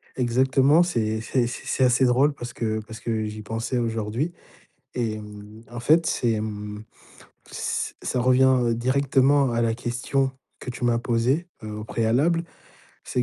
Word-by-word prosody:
Exactement, 130 +5 +3
c'est 110 -10 -1
c'est 120 +1 0
c'est 120 - -7
c'est 130 - 0
assez 125 +1 +4
drôle 130 +4 +3
parce 120 -3 -8
que 110 -3 -2
parce 110 0 -9
que 110 -2 -2
j'y 105 0 -6
pensais 115 +4 -3
aujourd'hui. 115 +6 -2 0.6
Et 115 -3 -1
mmh, 105 +1 -11
en 120 0 -6
fait, 160 +7 +4
c'est 115 -3 +1
mmh, 105 0 -6 0.7
ç - - -3
ça 125 - -1
revient 130 +1 +5
heu, 120 -1 +2
directement 135 +2 +3
à 120 0 0
la 115 -1 +1
question 125 +3 -1 0.3
que - - -7
tu 125 - -8
m'as 120 -1 +3
posée, 125 +8 0 0.2
heu, 110 0 -6
au - - -6
préalable. 130 +11 +1 0.6
C'est 125 - -1
120 Hz, 165 wpm, -24 LUFS, 110-130 Hz, 0.7 s, revient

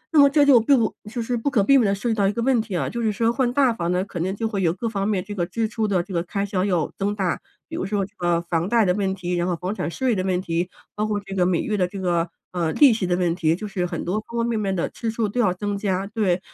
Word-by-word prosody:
那 - - +7
么 280 0 +8
这 290 0 +4
就 275 -4 +7
并 265 +5 +4
不 220 - 0 0.2
就 240 0 -3
是 245 +2 -1
不 235 +5 -1
可 230 -8 +2
避 275 +7 +5
免 235 -5 +3
地 200 - +1
涉 205 +5 -4
及 - - +2
到 200 -2 +2
一 195 - +2
个 235 - -5
问 255 -2 +3
题 215 -4 -5
啊， - - -1
就 235 - -4
是 220 -2 +1
说 225 +3 +1
换 250 -1 +1
大 265 -4 +3
房 175 -5 -2
呢， 180 +1 0
可 180 - -7
能 190 +4 -1
就 225 +2 -1
会 205 -3 -2
有 165 - +3
各 215 +6 -4
方 200 -3 -1
面 200 -4 0
这 205 - -7
个 175 - 0
支 220 +4 -1
出 220 -1 -1
的 185 -4 +1
这 195 - -9
个 170 - +1
开 200 +3 -2
销 190 -2 -1
要 180 -6 0
增 200 +1 -1
大， 190 -4 -1 0.3
比 - - -7
如 - - -2
说 200 0 -1
这 205 +2 -18
个 175 -1 +1
房 170 +1 -1
贷 230 -2 +4
的 180 - +3
问 195 -1 -1
题， 180 -1 -4
然 175 0 0
后 180 - 0
房 185 +4 -3
产 155 - -2
税 255 +7 0
的 185 - -1
问 185 -1 0
题， 175 0 -2 0.3
包 215 +1 -1
括 210 -1 -1
这 195 -1 -9
个 180 -2 +3
每 180 -2 +1
月 215 - -1
的 180 -2 +2
这 195 +2 -7
个， 175 -2 0 0.2
呃， 170 -3 -1
利 280 -5 +6
息 215 -5 -1
的 175 - +2
问 175 -2 +1
题， 165 -2 +1
就 210 +4 -6
是 185 -3 -2
很 - - -5
多 190 +5 0
方 235 - -6
方 230 - +1
面 230 -2 0
面 195 -2 -1
的 170 - 0
支 230 - -4
出 225 -1 -1
都 245 +5 -1
要 205 -6 +3
增 205 +2 -3
加。 195 -1 -1
对， 200 -4 0
200 Hz, 350 characters per minute, -23 LUFS, 180-225 Hz, 0.3 s, 么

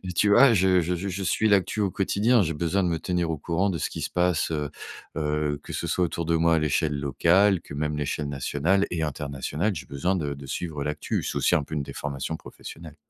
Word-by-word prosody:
tu 105 +3 +3
vois, 120 +4 +7
je 95 -2 +4
je 90 +2 -1
je 95 +3 -4
je 95 +1 -4
suis 110 +4 +2
l'actu 100 +2 +2
au 100 - +1
quotidien. 105 +4 +2
J'ai 80 - -1
besoin 85 +5 0
de 90 - +1
me 80 -1 -1
tenir 90 -2 -1
au 80 - -2
courant 85 +6 0
de 85 - -3
ce - - -1
qui - - -6
se - - -3
passe, 90 -3 +1
heu 75 -2 -2 0.5
heu, 75 -1 -1
que - - -8
ce - - -3
soit 90 - +1
autour 85 0 -3
de 85 +1 +1
moi, 85 0 +3
à - - +2
l'échelle 75 0 +1
locale, 90 +8 +3
que - - -11
même 75 +1 -2
l'échelle 75 0 -2
nationale 75 +8 +1
et 85 -2 -1
internationale, 75 +6 -2
j'ai 75 - -7
besoin 80 +7 -1
de 75 -5 -2
de 70 - -10
suivre 75 +1 -4
l'actu, 75 +1 -2
c'est - - -4
aussi - - +3
un 75 - +2
peu 75 - -10
une 75 - -1
déformation 70 +3 -4
professionnelle. 80 -2 -11
80 Hz, 240 wpm, -26 LUFS, 75-95 Hz, 0.5 s, vois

